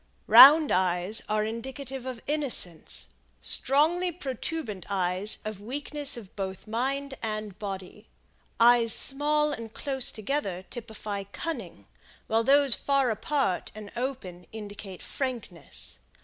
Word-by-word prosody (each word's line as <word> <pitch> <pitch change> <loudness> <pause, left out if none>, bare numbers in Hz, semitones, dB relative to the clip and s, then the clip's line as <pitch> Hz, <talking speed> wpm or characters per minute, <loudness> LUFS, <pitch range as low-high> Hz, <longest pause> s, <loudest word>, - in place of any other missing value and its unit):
Round 300 +2 +9
eyes 180 +3 +1
are 215 0 +1
indicative 260 +3 -6
of 250 -3 -6
innocence; 275 - 0 0.3
strongly 330 +6 +3
protuberant 265 - -5
eyes 190 +1 +2
of 215 -2 -6
weakness 285 +4 -2
of 205 -5 -11
both 190 -1 -5
mind 270 +5 -2
and 215 -3 -5
body. 200 +1 -7 0.5
Eyes 235 -1 +6
small 300 +2 +2
and 230 -6 -6
close 265 +1 -1
together 210 -5 -3
typify 215 -4 -6
cunning, 200 - -6 0.4
while 225 +1 +1
those 275 +1 +4
far 275 -2 +1
apart 220 -3 -1
and 210 -1 -9
open 235 -9 -5
indicate 205 -3 -9
frankness. 210 - -4
230 Hz, 115 wpm, -27 LUFS, 200-275 Hz, 0.5 s, Round